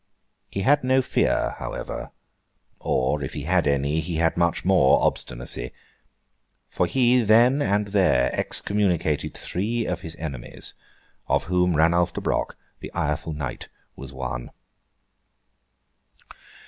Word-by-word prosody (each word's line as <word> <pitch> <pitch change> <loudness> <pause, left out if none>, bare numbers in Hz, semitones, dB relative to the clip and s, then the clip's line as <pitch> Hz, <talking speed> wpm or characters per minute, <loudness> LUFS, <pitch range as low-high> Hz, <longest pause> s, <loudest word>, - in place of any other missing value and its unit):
He 100 - -3
had 145 +7 +3
no 130 +1 +3
fear, - - +1
however—or, 65 +3 -5
if 65 - -5
he 75 - -4
had 90 0 +2
any, 70 +2 +1
he 85 +1 -3
had 80 0 +1
much 85 0 0
more 90 -8 +5
obstinacy—for 60 +7 -5
he, 125 +2 +3
then 120 +6 +5
and 100 -2 +1
there, 90 -11 +3
excommunicated 90 -7 0
three 110 +6 -2
of 90 - -3
his 80 -1 -7
enemies, 70 -7 -5 0.5
of - - +1
whom 90 -1 +1
Ranulf 85 +2 +3
de - - -4
Broc, - - -1 0.2
the - - -8
ireful 75 +1 -2
knight, 75 -4 -5 0.3
was 70 +1 -9
one. 65 -2 -5
85 Hz, 120 wpm, -24 LUFS, 70-100 Hz, 0.5 s, more